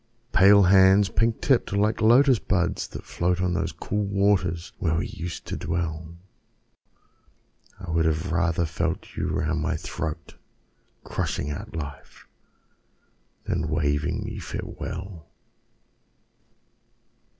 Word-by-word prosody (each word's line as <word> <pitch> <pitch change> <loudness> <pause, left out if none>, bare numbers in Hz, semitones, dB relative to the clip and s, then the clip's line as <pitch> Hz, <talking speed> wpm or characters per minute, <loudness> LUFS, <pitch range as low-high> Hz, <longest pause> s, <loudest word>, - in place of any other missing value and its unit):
Pale 100 +2 +7
hands, 95 +1 +6
pink 115 +3 0
tipped, 130 -7 +2
like 105 +2 +1
Lotus 125 +2 +5
buds 90 -2 -1
that - - -9
float 90 +1 -1
On 90 -1 0
those 85 - -1
cool 105 +1 -3
waters 100 -4 0
where 80 -4 +1
we 85 - -1
used 85 +1 -6
to - - -4
dwell, 85 0 -4 1.6
I 90 -4 -6
would 80 -1 +2
have 80 +2 0
rather 85 0 +1
felt 85 +1 -3
you - - -2
round 80 -2 -1
my 80 +1 -1
throat, 80 -1 -6 0.7
Crushing 75 - -3
out 75 - -7
life, 70 -3 -8 1.2
than 80 -2 -2
waving 75 -2 0
me - - -6
farewell! 90 -3 -7
85 Hz, 115 wpm, -25 LUFS, 80-100 Hz, 1.6 s, Pale